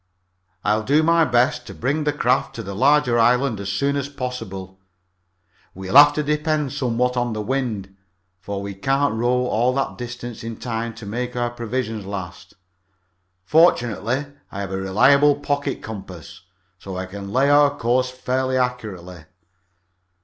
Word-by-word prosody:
"I'll 105 +1 +2
do 145 +8 +2
my 165 0 +4
best 125 -1 +1
to - - -9
bring 145 +5 -1
the 150 - +2
craft 135 -4 0
to 115 - -5
the 100 -1 -6
larger 130 +1 +3
island 125 0 +3
as 100 0 -4
soon 140 +8 0
as 140 0 -2
possible. 115 -9 -6 1.0
We'll 95 0 -6
have 145 +1 +10
to 150 - -1
depend 150 -1 0
somewhat 125 0 0
on 120 -2 -1
the 110 - -3
wind, 110 -6 -3 0.4
for 100 +1 -5
we 100 0 -5
can't 135 +6 0
row 125 +2 +1
all 125 +2 +1
that 135 -2 -2
distance 120 -1 -7
in 115 -1 -6
time 115 -1 -4
to 115 -2 -10
make 120 +4 -4
our 120 -1 -1
provisions 115 -3 -4
last. 100 -2 -7 0.9
Fortunately, 125 - +2 0.3
I 100 - -5
have 95 -1 -5
a 95 - -2
reliable 140 +10 +4
pocket 145 -1 -3
compass, 95 -7 -9 0.4
so 95 -1 -7
I 95 - -3
can 100 +1 -8
lay 135 +5 +3
our 145 0 +4
course 125 +2 +1
fairly 130 0 -1
accurately. 100 -10 -4
120 Hz, 155 wpm, -22 LUFS, 100-135 Hz, 1.0 s, have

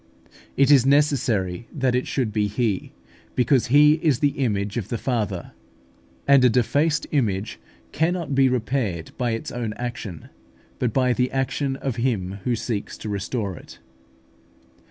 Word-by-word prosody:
It 140 +1 +5
was 135 -4 +7
necessary 125 -9 +1
that 130 -3 0
it 125 +1 0
should 120 -6 -1
be 105 0 +1
He, 105 -2 -1 0.4
because 125 +1 +2
He 150 +4 +5
is 150 -7 +2
the 145 - +2
image 100 -4 -1
of 115 -6 -3
the 120 - -3
Father; 105 -8 -2 0.8
and 140 -2 +6
a 125 - +6
defaced 145 +6 +1
image 105 -8 -1 0.3
cannot 165 -2 -1
be 135 -1 +4
repaired 115 -8 -2
by 120 -2 0
its 115 - -5
own 115 -3 -3
action, 120 - -6 0.5
but 125 - 0
by 125 +1 +2
the 125 +1 0
action 135 +1 -1
of 135 -3 -4
him 100 -6 -1
who 125 - +1
seeks 110 -2 -4
to 110 - -6
restore 100 0 -3
it. - - -13
125 Hz, 155 wpm, -23 LUFS, 105-135 Hz, 0.8 s, was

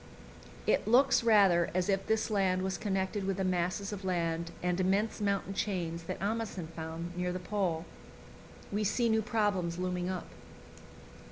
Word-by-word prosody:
It - - +2
looks 250 +2 +5
rather 195 -7 +5
as 185 -1 +1
if 195 -1 0
this 220 0 +1
land 190 -3 +2
was 190 -1 -1
connected 195 0 -1
with 195 0 -1
the 190 - 0
masses 185 +2 -1
of 200 -1 -6
land 170 -2 -1
and 180 0 0
immense 200 +4 +1
mountain 200 -1 0
chains 175 -5 -2
that - - -4
Amundsen 205 -5 -2
found 165 +2 -5
near 180 0 -1
the 180 - -2
Pole. 180 -3 -1 0.9
We 210 +1 0
see 235 +3 +2
new 220 0 +3
problems 205 -7 0
looming 180 0 -2
up. 185 -2 -3
190 Hz, 160 wpm, -31 LUFS, 180-205 Hz, 0.9 s, looks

